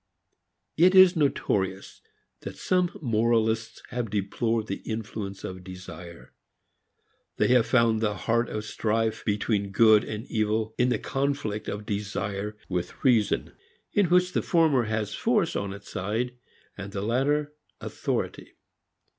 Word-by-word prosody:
It 180 Hz, +4 st, +5 dB
is 185 Hz, -1 st, +8 dB
notorious 100 Hz, -, -1 dB, 0.4 s
that -, -, -8 dB
some 180 Hz, -1 st, +1 dB
moralists 115 Hz, -1 st, +1 dB
have 120 Hz, -2 st, -3 dB
deplored 110 Hz, +3 st, -1 dB
the 100 Hz, -2 st, -4 dB
influence 110 Hz, -3 st, -6 dB
of 95 Hz, 0 st, -6 dB
desire; 90 Hz, -2 st, -10 dB, 1.0 s
they -, -, +2 dB
have 125 Hz, -2 st, +4 dB
found 115 Hz, -3 st, +3 dB
the 105 Hz, -2 st, 0 dB
heart 115 Hz, +4 st, 0 dB
of 110 Hz, 0 st, -4 dB
strife 110 Hz, 0 st, -1 dB
between 105 Hz, -1 st, 0 dB
good 110 Hz, +1 st, +5 dB
and 110 Hz, +2 st, -5 dB
evil 110 Hz, -1 st, -1 dB
in 125 Hz, +1 st, +3 dB
the -, -, +1 dB
conflict 135 Hz, -6 st, -2 dB
of 105 Hz, +1 st, -5 dB
desire 100 Hz, 0 st, -3 dB
with 90 Hz, -2 st, -4 dB
reason, 115 Hz, -5 st, +2 dB, 0.4 s
in 205 Hz, -3 st, +3 dB
which 180 Hz, +1 st, +3 dB
the -, -, +1 dB
former 155 Hz, -8 st, +3 dB
has 110 Hz, -1 st, -2 dB
force -, -, +1 dB
on 100 Hz, -1 st, -2 dB
its 100 Hz, +1 st, -10 dB
side 115 Hz, +6 st, -2 dB, 0.4 s
and 100 Hz, 0 st, -8 dB
the 100 Hz, -, -3 dB
latter 145 Hz, +6 st, 0 dB, 0.3 s
authority. -, -, -4 dB
110 Hz, 135 wpm, -26 LUFS, 100-125 Hz, 1.0 s, is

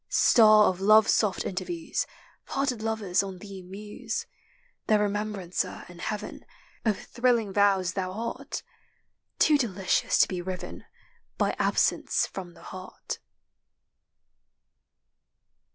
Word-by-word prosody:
Star 215 Hz, -2 st, +6 dB
of 185 Hz, 0 st, -1 dB
love's 215 Hz, +2 st, +6 dB
soft 210 Hz, -4 st, +1 dB
interviews, 320 Hz, -, -3 dB, 0.4 s
Parted 270 Hz, -5 st, -1 dB
lovers 220 Hz, -4 st, 0 dB
on 195 Hz, -2 st, -6 dB
thee 195 Hz, 0 st, -9 dB
muse; 200 Hz, +3 st, -6 dB, 0.6 s
Their 215 Hz, -, +5 dB
remembrancer 205 Hz, -3 st, -2 dB
in 175 Hz, -1 st, -13 dB
heaven 210 Hz, +2 st, -5 dB, 0.4 s
Of 215 Hz, -3 st, +1 dB
thrilling 235 Hz, -5 st, 0 dB
vows 195 Hz, -3 st, +3 dB
thou 185 Hz, -2 st, -2 dB
art, 225 Hz, +4 st, -5 dB, 0.7 s
Too 300 Hz, -2 st, +4 dB
delicious 195 Hz, -7 st, +1 dB
to -, -, +5 dB
be 180 Hz, -2 st, -4 dB
riven 185 Hz, 0 st, -6 dB, 0.5 s
By -, -, +1 dB
absence -, -, +2 dB
from 180 Hz, -3 st, -8 dB
the -, -, -16 dB
heart. 185 Hz, 0 st, -7 dB
205 Hz, 110 wpm, -27 LUFS, 185-220 Hz, 0.7 s, Star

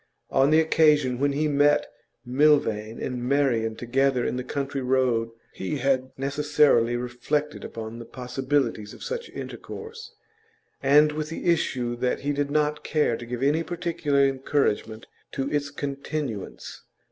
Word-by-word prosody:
On 135 Hz, +1 st, +4 dB
the 155 Hz, +1 st, +5 dB
occasion 150 Hz, -5 st, +3 dB
when 140 Hz, 0 st, +2 dB
he 155 Hz, +2 st, +1 dB
met 145 Hz, 0 st, +3 dB, 0.4 s
Milvain 120 Hz, -5 st, +2 dB
and 125 Hz, -1 st, -3 dB
Marian 125 Hz, -5 st, +1 dB
together 130 Hz, +1 st, +1 dB
in -, -, -1 dB
the 125 Hz, -, -3 dB
country 140 Hz, 0 st, -3 dB
road 125 Hz, -3 st, +1 dB, 0.2 s
he 95 Hz, +10 st, -3 dB
had 130 Hz, -1 st, +1 dB
necessarily 140 Hz, -3 st, +2 dB
reflected 125 Hz, +5 st, -2 dB
upon 115 Hz, +1 st, -7 dB
the 115 Hz, -, -8 dB
possibilities 125 Hz, -4 st, -2 dB
of -, -, -11 dB
such 475 Hz, -1 st, -4 dB
intercourse, 450 Hz, +1 st, -8 dB, 0.7 s
and 150 Hz, +2 st, +5 dB
with 155 Hz, 0 st, -4 dB
the 165 Hz, -, -6 dB
issue 130 Hz, -8 st, +1 dB
that 125 Hz, +1 st, -1 dB
he 145 Hz, +1 st, -1 dB
did 145 Hz, 0 st, -1 dB
not 150 Hz, 0 st, 0 dB
care 150 Hz, -6 st, +1 dB
to 120 Hz, -, -8 dB
give 125 Hz, +1 st, -4 dB
any 150 Hz, +4 st, +3 dB
particular 165 Hz, -4 st, 0 dB
encouragement 130 Hz, -5 st, -1 dB, 0.3 s
to 135 Hz, 0 st, -2 dB
its 145 Hz, -1 st, 0 dB
continuance. 140 Hz, -5 st, -5 dB
140 Hz, 145 wpm, -25 LUFS, 125-150 Hz, 0.7 s, the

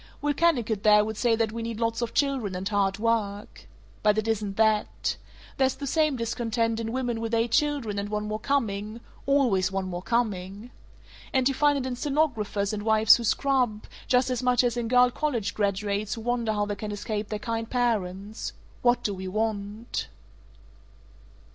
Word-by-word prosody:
Will 290 Hz, 0 st, 0 dB
Kennicott 245 Hz, -10 st, +1 dB
there 210 Hz, 0 st, +5 dB
would 220 Hz, 0 st, -4 dB
say 230 Hz, +1 st, +2 dB
that 225 Hz, -1 st, 0 dB
we 230 Hz, +1 st, -5 dB
need 230 Hz, -1 st, -4 dB
lots 230 Hz, 0 st, 0 dB
of 235 Hz, -, -3 dB
children 265 Hz, -9 st, 0 dB
and 185 Hz, +1 st, -3 dB
hard 200 Hz, -2 st, +1 dB
work. 210 Hz, -2 st, -2 dB, 0.3 s
But 210 Hz, 0 st, +3 dB
it 215 Hz, +1 st, 0 dB
isn't 210 Hz, -3 st, -1 dB
that. 220 Hz, -1 st, +1 dB, 0.4 s
There's 265 Hz, -1 st, +2 dB
the 280 Hz, -, -6 dB
same 305 Hz, 0 st, +2 dB
discontent 230 Hz, -1 st, -1 dB
in 225 Hz, 0 st, -3 dB
women 245 Hz, -2 st, -2 dB
with 230 Hz, 0 st, -1 dB
eight 230 Hz, 0 st, +1 dB
children 265 Hz, -7 st, +1 dB
and 200 Hz, +1 st, -4 dB
one 210 Hz, 0 st, -2 dB
more 215 Hz, 0 st, -3 dB
coming 220 Hz, -4 st, -1 dB, 0.3 s
always 245 Hz, -10 st, +3 dB
one 195 Hz, -1 st, -2 dB
more 175 Hz, -1 st, -4 dB
coming! 205 Hz, 0 st, -2 dB, 0.6 s
And 260 Hz, -2 st, +3 dB
you 275 Hz, -, +1 dB
find 290 Hz, +2 st, +3 dB
it 265 Hz, -, -2 dB
in 250 Hz, -, -3 dB
stenographers 240 Hz, -8 st, 0 dB
and 210 Hz, -, -3 dB
wives 220 Hz, 0 st, +6 dB
who 240 Hz, -, -5 dB
scrub, 250 Hz, -3 st, +1 dB, 0.2 s
just 250 Hz, 0 st, +3 dB
as 250 Hz, -, -1 dB
much 250 Hz, -1 st, +3 dB
as 240 Hz, -1 st, +1 dB
in 240 Hz, -1 st, -2 dB
girl 250 Hz, +1 st, +5 dB
college 240 Hz, -8 st, -1 dB
graduates 205 Hz, +1 st, -1 dB
who 225 Hz, -, -7 dB
wonder 235 Hz, -1 st, 0 dB
how 205 Hz, -1 st, 0 dB
they 205 Hz, -, -3 dB
can 210 Hz, +1 st, -5 dB
escape 210 Hz, 0 st, -3 dB
their 215 Hz, -, -2 dB
kind 225 Hz, +1 st, -3 dB
parents. 215 Hz, -4 st, -2 dB, 0.3 s
What 245 Hz, 0 st, +3 dB
do 205 Hz, -, 0 dB
we 190 Hz, 0 st, -6 dB
want?" 215 Hz, +2 st, -3 dB
225 Hz, 185 wpm, -26 LUFS, 210-245 Hz, 0.6 s, wives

